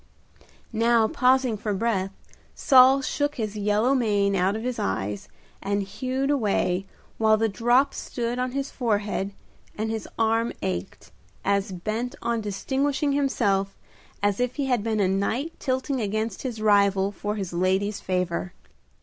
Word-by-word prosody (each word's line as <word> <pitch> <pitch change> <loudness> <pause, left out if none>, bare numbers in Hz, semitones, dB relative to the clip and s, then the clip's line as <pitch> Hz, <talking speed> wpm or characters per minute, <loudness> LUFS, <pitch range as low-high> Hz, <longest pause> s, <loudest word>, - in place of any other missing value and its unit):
Never 230 0 +3
pausing 255 -1 +2
for 210 0 -2
breath 195 -2 0 0.5
Saul 265 +1 +6
shook 290 +2 -1
his 215 -3 -3
yellow 210 +5 +2
mane 205 -6 +2
out 190 +2 +2
of 220 - -4
his 250 -1 -3
eyes, 95 +1 -2 0.3
and 200 0 -1
hewed 255 +7 -2
away, 195 -7 0 0.3
while 220 -1 +4
the 225 +1 +2
drops 240 +6 +2
stood 240 0 -3
on 250 0 -1
his 275 0 -3
forehead 205 -4 -1 0.5
and 220 +1 -2
his 220 -1 -4
arm 225 +1 +1
ached, 90 -1 -4 0.3
as 200 0 +1
bent 220 +8 -3
on 235 -1 -1
distinguishing 270 +8 -1
himself 205 -9 0 0.5
as 205 +1 +1
if 250 0 0
he 285 - -1
had 250 -4 +1
been 220 -1 0
a 195 - +3
knight 220 - -1
tilting 260 0 -1
against 215 0 -2
his 245 -4 -4
rival 200 -2 +3
for 205 +1 -4
his 195 -4 -4
lady's 190 +3 0
favor. 180 -1 -2
220 Hz, 150 wpm, -25 LUFS, 200-250 Hz, 0.5 s, Saul